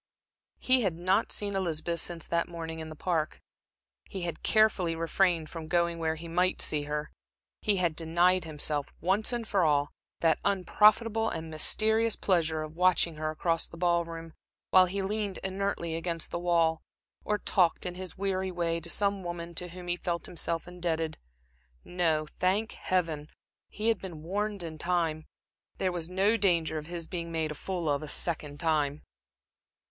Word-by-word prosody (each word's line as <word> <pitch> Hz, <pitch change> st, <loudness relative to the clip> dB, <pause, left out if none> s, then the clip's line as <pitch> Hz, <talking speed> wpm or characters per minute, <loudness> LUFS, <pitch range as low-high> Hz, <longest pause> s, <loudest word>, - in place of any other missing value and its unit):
He 255 Hz, 0 st, +3 dB
had 190 Hz, -7 st, 0 dB
not 185 Hz, +3 st, +1 dB
seen 200 Hz, -1 st, -2 dB
Elizabeth 170 Hz, -2 st, -1 dB
since 170 Hz, 0 st, -1 dB
that 170 Hz, 0 st, 0 dB
morning 165 Hz, -1 st, -6 dB
in 160 Hz, 0 st, -6 dB
the 155 Hz, -, -8 dB
Park. 160 Hz, -1 st, -1 dB, 0.7 s
He 190 Hz, -3 st, -5 dB
had 170 Hz, -1 st, -4 dB
carefully 210 Hz, -6 st, +3 dB
refrained 165 Hz, 0 st, +1 dB
from 165 Hz, -2 st, -7 dB
going 170 Hz, 0 st, +1 dB
where 160 Hz, -1 st, 0 dB
he 165 Hz, +1 st, -8 dB
might 180 Hz, +2 st, +1 dB
see 150 Hz, -1 st, +2 dB
her. 150 Hz, 0 st, -3 dB, 0.5 s
He 210 Hz, -2 st, +2 dB
had 175 Hz, -4 st, +1 dB
denied 175 Hz, +3 st, +2 dB
himself, 150 Hz, -2 st, 0 dB
once 195 Hz, +6 st, +2 dB
for 200 Hz, -4 st, +2 dB
all, 145 Hz, -2 st, +2 dB, 0.3 s
that 165 Hz, -2 st, +3 dB
unprofitable 215 Hz, +4 st, +3 dB
and 160 Hz, 0 st, -5 dB
mysterious 220 Hz, +8 st, +2 dB
pleasure 165 Hz, -4 st, +1 dB
of 155 Hz, +1 st, -8 dB
watching 175 Hz, -2 st, +3 dB
her 155 Hz, 0 st, -2 dB
across 165 Hz, +1 st, 0 dB
the 170 Hz, -, -12 dB
ball 170 Hz, 0 st, +2 dB
room, 165 Hz, -1 st, -8 dB, 0.4 s
while 185 Hz, -1 st, +7 dB
he 195 Hz, +2 st, -2 dB
leaned 205 Hz, 0 st, -2 dB
inertly 190 Hz, -3 st, -2 dB
against 165 Hz, 0 st, -2 dB
the 170 Hz, -, -2 dB
wall, 165 Hz, -2 st, +2 dB, 0.4 s
or 210 Hz, -, 0 dB
talked, 180 Hz, -4 st, +2 dB
in 180 Hz, -, -3 dB
his 185 Hz, -1 st, -7 dB
weary 190 Hz, -1 st, -1 dB
way, 170 Hz, -1 st, -1 dB
to 170 Hz, +1 st, -5 dB
some 200 Hz, +1 st, +2 dB
woman 170 Hz, -1 st, -5 dB
to 180 Hz, +2 st, -2 dB
whom 180 Hz, +1 st, -10 dB
he 175 Hz, -, +1 dB
felt 170 Hz, -1 st, -3 dB
himself 165 Hz, 0 st, -3 dB
indebted. 165 Hz, -3 st, -2 dB, 0.6 s
No, 165 Hz, -4 st, +1 dB
thank 195 Hz, +5 st, +1 dB
Heaven, 165 Hz, -5 st, -1 dB, 0.4 s
he 215 Hz, +2 st, -1 dB
had 230 Hz, -, +2 dB
been 170 Hz, -5 st, -8 dB
warned 200 Hz, +2 st, -2 dB
in 160 Hz, -2 st, -7 dB
time; 165 Hz, -3 st, 0 dB, 0.5 s
there 185 Hz, -1 st, 0 dB
was 170 Hz, -1 st, -4 dB
no 195 Hz, +5 st, +3 dB
danger 165 Hz, -6 st, +2 dB
of 150 Hz, -, -10 dB
his 170 Hz, -1 st, -5 dB
being 170 Hz, -1 st, -5 dB
made 160 Hz, -2 st, -1 dB
a -, -, -3 dB
fool 175 Hz, +2 st, -4 dB
of 145 Hz, -1 st, +1 dB
a 155 Hz, -, -7 dB
second 150 Hz, -4 st, +1 dB
time. 150 Hz, -3 st, 0 dB
170 Hz, 175 wpm, -29 LUFS, 160-185 Hz, 0.7 s, while